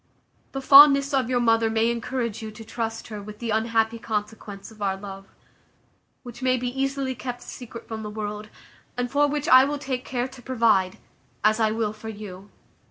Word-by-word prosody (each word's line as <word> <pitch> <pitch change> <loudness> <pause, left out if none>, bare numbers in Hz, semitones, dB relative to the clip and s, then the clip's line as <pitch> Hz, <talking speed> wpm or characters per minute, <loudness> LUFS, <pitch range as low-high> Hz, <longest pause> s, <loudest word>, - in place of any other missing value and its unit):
The 270 - -3
fondness 280 0 +8
of 260 -3 +1
your 250 -1 +2
mother 225 -1 +3
may 225 +1 +2
encourage 235 -1 -3
you 220 - -6
to 225 +1 -11
trust 225 -1 -4
her 210 -2 -6
with 210 +1 -10
the 230 0 -4
unhappy 225 +1 +1
consequence 210 -2 -5
of 215 -1 -16
our 195 -1 0
love, 195 0 -9 1.0
which 245 0 -10
may 255 0 +2
be 245 0 -2
easily 270 +1 -2
kept 245 -1 -6
a - - -15
secret 235 -2 -9
from 220 -1 -5
the 210 - -5
world, 210 0 -5 0.5
and 245 0 -2
for 290 +1 +3
which 290 0 -2
I 255 0 +8
will 290 +2 -1
take 260 -3 -4
care 250 -1 -2
to 260 -1 -14
provide, 225 -7 +2 0.5
as 215 +1 +3
I 220 -1 +3
will 215 -1 -1
for 215 +1 -9
you. 205 -2 -9
230 Hz, 195 wpm, -25 LUFS, 215-255 Hz, 1.0 s, fondness